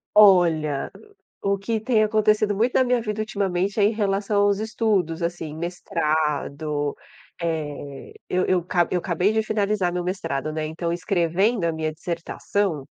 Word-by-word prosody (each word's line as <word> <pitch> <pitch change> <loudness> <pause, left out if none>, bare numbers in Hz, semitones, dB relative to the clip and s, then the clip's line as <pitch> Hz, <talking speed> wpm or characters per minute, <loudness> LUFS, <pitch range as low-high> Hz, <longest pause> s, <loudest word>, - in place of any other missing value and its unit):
Olha, 170 -8 +5 0.5
o 200 0 +1
que 220 +3 -2
tem 225 -1 +2
acontecido 215 -1 +2
muito 235 +5 +1
na - - +5
minha 250 -1 +2
vida 215 -1 -4
ultimamente 200 -3 -1
é - - +4
em 205 - +4
relação 205 -1 +1
aos 205 -1 +3
estudos, 210 -7 0
assim. 170 -2 -3
Mestrado, 155 -3 -1 0.5
eh, 145 -4 -4 0.2
eu 185 0 +1
eu 180 -2 +1
ca 175 0 +2
cabei 180 +3 0
de 220 0 +1
finalizar 205 -4 0
meu 180 0 -2
mestrado, 155 -5 -3
né. 155 0 -2
Então 170 +2 -3
escrevendo 180 +3 +1
a 165 - +1
minha 160 0 -2
dissertação, 170 0 -2
180 Hz, 150 wpm, -24 LUFS, 160-210 Hz, 0.5 s, Olha